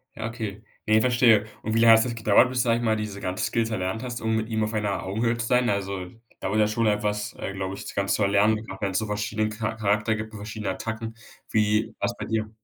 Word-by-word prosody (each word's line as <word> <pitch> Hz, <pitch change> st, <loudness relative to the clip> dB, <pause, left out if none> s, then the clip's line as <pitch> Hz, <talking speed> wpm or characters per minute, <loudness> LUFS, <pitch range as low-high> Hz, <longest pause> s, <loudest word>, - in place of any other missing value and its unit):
Ja, 110 Hz, -, -4 dB
okay, 110 Hz, -3 st, -6 dB, 0.2 s
ne, 110 Hz, +1 st, +5 dB
verstehe 120 Hz, -4 st, +4 dB, 0.2 s
und 110 Hz, 0 st, -2 dB
wie -, -, +3 dB
lange 115 Hz, 0 st, +8 dB
hat 110 Hz, -, +2 dB
es 120 Hz, -2 st, -3 dB
gedauert, 110 Hz, +2 st, +4 dB
bis 125 Hz, -1 st, +1 dB
sage 115 Hz, -2 st, +2 dB
ich 120 Hz, -, -3 dB
mal 110 Hz, -2 st, +2 dB
diese 105 Hz, -2 st, -5 dB
ganze 90 Hz, -1 st, -2 dB
Skills 115 Hz, -1 st, 0 dB
erlernt 95 Hz, 0 st, -2 dB
hast, 120 Hz, -1 st, -5 dB
um 110 Hz, 0 st, 0 dB
mit 110 Hz, 0 st, -1 dB
ihm 110 Hz, -1 st, 0 dB
auf 110 Hz, +1 st, -2 dB
einer 105 Hz, -2 st, -1 dB
Augenhöhe 115 Hz, +5 st, 0 dB
zu 115 Hz, -, -2 dB
sein? 125 Hz, +1 st, +2 dB
Also, 100 Hz, -2 st, -2 dB, 0.3 s
dauert 105 Hz, +3 st, -1 dB
ja 105 Hz, -, +4 dB
schon 110 Hz, +1 st, 0 dB
etwas, 105 Hz, 0 st, 0 dB
äh, 100 Hz, -, -4 dB
glaube 95 Hz, 0 st, -4 dB
ich, -, -, -8 dB
das -, -, -7 dB
Ganze 100 Hz, 0 st, +1 dB
zu 105 Hz, -, +1 dB
erlernen, 105 Hz, +2 st, +3 dB
wenn 100 Hz, -1 st, -1 dB
es 95 Hz, -, 0 dB
so 110 Hz, -, 0 dB
verschiedenen 105 Hz, +1 st, -1 dB
Cha 110 Hz, 0 st, -3 dB
Charakter 105 Hz, +1 st, +1 dB
gibt 110 Hz, 0 st, -5 dB
und -, -, -7 dB
verschiedenen 105 Hz, 0 st, -4 dB
Attacken, 110 Hz, 0 st, -5 dB, 0.4 s
wie 105 Hz, 0 st, +2 dB
wars -, -, -1 dB
bei -, -, -5 dB
dir? 110 Hz, -1 st, -1 dB
110 Hz, 250 wpm, -25 LUFS, 105-115 Hz, 0.4 s, lange